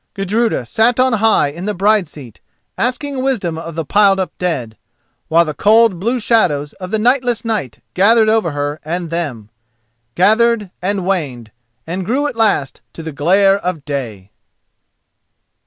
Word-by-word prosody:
Gudruda 205 - -1
sat 230 - +1
on 255 -1 +3
high 220 -8 +3
in 170 +6 -8
the 210 - -2
bride's 200 -2 +2
seat, 130 -9 -12 0.3
asking 260 +3 -2
wisdom 225 -11 -1
of 165 -1 -8
the 165 -1 -3
piled 200 +3 +3
up 190 - -3
dead, 140 -12 -2 0.5
while 165 +2 +3
the 155 - -4
cold 215 0 +3
blue 235 +6 -1
shadows 155 -11 +1
of 185 - -5
the 220 - 0
nightless 245 +1 +1
night 205 - -3
gathered 220 +4 +4
over 215 -5 +2
her 145 0 -3
and 170 +1 -4
them—gathered, 120 - -2
and 190 0 -2
waned, 135 - -3 0.3
and 180 +3 -4
grew 255 +10 -1
at 290 - -3
last 210 -12 0
to 165 - -9
the 160 - -5
glare 195 +7 +3
of 180 -6 -4
day. 115 -9 -5
185 Hz, 155 wpm, -16 LUFS, 145-220 Hz, 0.5 s, gathered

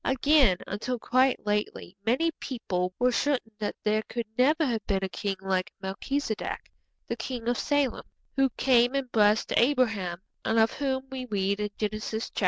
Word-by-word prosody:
Again, 265 - +4
until 240 +5 -3
quite 255 +2 +2
lately 210 -3 -2
many 265 +10 +2
people 185 -8 -2
were 250 +1 +3
certain 250 -3 0
that 210 - -2
there 215 0 +2
could 235 -1 -3
never 300 +6 +3
have 230 -5 -1
been 195 -1 0
a - - 0
king 195 +1 -2
like 190 -1 -1
Melchizedek, 220 +5 -3 0.4
the 235 - -2
king 235 0 -5
of 240 0 +1
Salem, 285 -3 0 0.3
who 270 -1 +3
came 245 0 +4
and 265 -3 -2
blessed 210 0 +3
Abraham, 225 -9 +2 0.2
and 225 - +1
of 225 0 +5
whom 265 -2 -2
we 260 -1 -4
read 200 -3 0
in 210 0 -1
Genesis 215 +1 -3
xiv. - - -4
230 Hz, 170 wpm, -28 LUFS, 210-265 Hz, 0.4 s, of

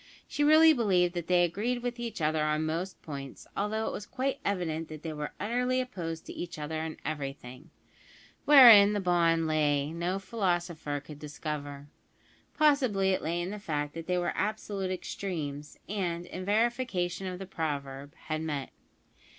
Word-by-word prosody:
She 290 - -1
really 315 +2 +7
believed 185 - +2
that 175 -2 -4
they 180 -1 +4
agreed 225 +8 -1
with 245 0 -3
each 230 -6 -5
other 155 0 +1
on 155 +1 0
most 170 +4 -3
points, 140 -3 -8
although 215 +2 -1
it - - -2
was 205 - -6
quite 270 +1 -2
evident 165 -5 -2
that 155 -1 -9
they 160 -2 -4
were 150 0 -5
utterly 250 +4 0
opposed 170 -11 -4
to - - -8
each 175 -1 -6
other 155 +1 -3
in 160 -1 -5
everything. 135 -4 -6 0.8
Wherein 230 -8 +9
the 205 - 0
bond 170 -3 +2
lay 150 -1 +1
no 175 +3 -1
philosopher 175 -7 -2
could 145 0 -11
discover. 145 -1 -6 0.7
Possibly 255 -11 +3
it 185 - 0
lay 170 +2 -1
in 180 +2 -3
the 210 - -6
fact 150 -6 -3
that 165 -1 -7
they 180 0 +1
were 175 - 0
absolute 205 -2 -2
extremes, 155 -6 -5
and, 175 -4 -2
in 185 +1 -7
verification 205 -5 0
of 180 -1 -4
the 195 - -7
proverb, 145 -5 -4
had 155 0 -2
met. 145 -4 -3
175 Hz, 165 wpm, -29 LUFS, 155-205 Hz, 0.8 s, Wherein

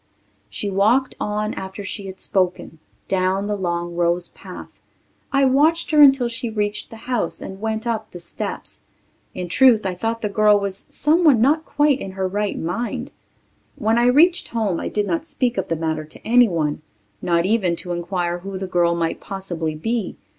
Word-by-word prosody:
She 205 - -4
walked 215 +7 +2
on 210 +1 -2
after 190 +1 -7
she 195 0 -6
had 190 0 -9
spoken, 180 -4 -1 0.3
down 190 +1 0
the 210 0 -1
long 175 -2 -2
rose 175 0 +1
path. - - -12 0.5
I 275 0 +3
watched 310 +7 +3
her 305 -1 +6
until 270 -3 +6
she 235 0 -4
reached 210 -1 -2
the - - -10
house 245 -9 -1
and 190 +1 -8
went 220 0 -2
up 220 -2 -2
the 175 - -10
steps. 170 0 -5 0.5
In 180 -1 -4
truth 230 +2 +5
I 190 - -1
thought 225 +5 -3
the - - +1
girl 210 0 +4
was 195 -1 -3
someone 305 -4 +4
not 295 +7 +3
quite 290 -2 +2
in 190 - -6
her 190 0 -1
right 205 +2 -2
mind. 190 +9 -3 0.6
When 220 +2 +1
I 240 - +3
reached 330 +8 +4
home 215 -7 -1
I - - -3
did 210 -1 -1
not 170 -4 -1
speak 245 -2 -1
of - - -3
the 165 - -1
matter 160 -1 -2
to 155 - -13
anyone, 175 -12 +3 0.4
not 170 -1 +1
even 190 -4 +1
to 175 +1 -6
inquire 175 0 -2
who 195 +1 -6
the 190 - -4
girl 175 -2 +2
might 165 -1 -1
possibly 175 -5 -4
be. 225 +5 -3
200 Hz, 180 wpm, -21 LUFS, 175-235 Hz, 0.6 s, her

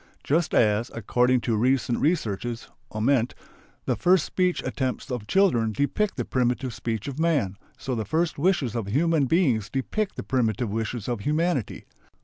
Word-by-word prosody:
Just 160 +3 +1
as, 110 +2 +3
according 125 +3 +2
to 115 +1 0
recent 125 +1 +1
researches 120 - -1 0.2
(Ament), 115 +2 +1 0.5
the - - +1
first 180 -2 +3
speech 180 -1 0
attempts 130 0 -3
of 120 -4 -4
children 120 - +3
depict 165 - 0
the - - -2
primitive 125 0 0
speech 110 +1 -4
of 140 +1 -5
man, 145 - +1 0.2
so 135 - -4
the 110 -2 -1
first 160 - -1
wishes 155 - +1
of 115 -4 -2
human 150 +6 +2
beings 130 - +2
depict 200 +10 -2
the - - -5
primitive 120 -4 0
wishes 110 0 -3
of 120 -3 -2
humanity. 150 - -1
125 Hz, 155 wpm, -25 LUFS, 115-160 Hz, 0.5 s, as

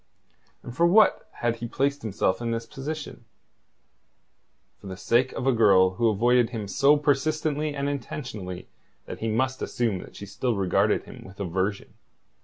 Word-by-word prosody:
And 120 - -9
for 170 +5 +4
what 210 +4 +4
had 120 -1 0
he 120 - -5
placed 140 +4 -1
himself 100 -1 -1
in 120 - -2
this 115 0 -2
position? 140 -1 -7 1.5
For - - -12
the 95 -1 -7
sake 120 +6 +2
of 130 - -4
a 135 - +4
girl 100 -6 +5
who 115 +5 +1
avoided 120 +3 +3
him 110 -4 -5
so 140 +9 +4
persistently 150 +1 0
and 140 0 -2
intentionally 115 -9 -5 0.4
that - - -8
he 115 - -2
must 130 +4 -1
assume 115 -6 -1
that - - -12
she 100 - -8
still 110 +5 -2
regarded 95 -2 +1
him - - -12
with 95 +2 -14
aversion. 95 +2 -2
120 Hz, 165 wpm, -26 LUFS, 100-140 Hz, 1.5 s, girl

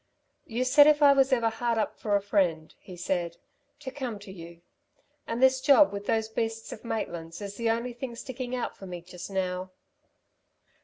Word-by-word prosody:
"You 240 +2 -1
said 285 +3 +7
if 305 - +7
ever - - +9
I 280 - +8
was 270 -1 +3
hard 230 -1 +1
up 220 - -1
for 205 -2 0
a 200 - +1
friend," 175 -6 0
he 180 -2 -12
said, 175 -1 -2 0.4
"to 265 -3 -6
come 255 -6 -5
to 200 -1 -11
you. 170 -2 -11 0.7
And 235 +3 -1
this 260 0 +5
job 285 -2 +6
with 200 0 -6
those 220 -1 +1
beasts 225 0 -3
of - - -9
Maitland's 170 -8 -4
is 200 -1 -7
the 230 -1 -1
only 235 +2 -1
thing 240 0 -6
sticking 255 +1 -5
out 245 - -3
for 195 - -11
me 175 -2 -7
just 180 +1 -9
now." 185 -1 -2
225 Hz, 195 wpm, -28 LUFS, 185-250 Hz, 0.7 s, ever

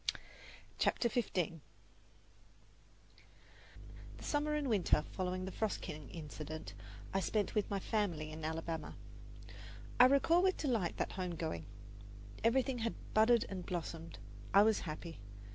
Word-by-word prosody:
CHAPTER 235 - +3
XV 235 -1 0
The 165 -3 0 2.6
summer 300 +1 +1
and 295 -2 0
winter 210 -7 +3
following 185 0 -2
the 190 - -4
"Frost 220 -1 -1
King" 150 -3 -7
incident 155 - -7 0.4
I 195 - +3
spent 205 +1 0
with 210 - +1
my 200 - 0
family 180 -8 -1
in 155 0 -7
Alabama. 160 +1 -3 1.0
I 250 - +11
recall 280 +6 +5
with 375 0 +3
delight 230 - 0
that - - -1
home 180 -2 -3
going. 160 - -3 0.8
Everything 255 +2 +3
had 230 0 -1 0.2
budded 225 +2 +5
and 185 -2 -5
blossomed. 165 - -5 0.4
I 200 - +9
was 220 0 +4
happy. 165 +2 -6
190 Hz, 125 wpm, -36 LUFS, 165-230 Hz, 2.6 s, I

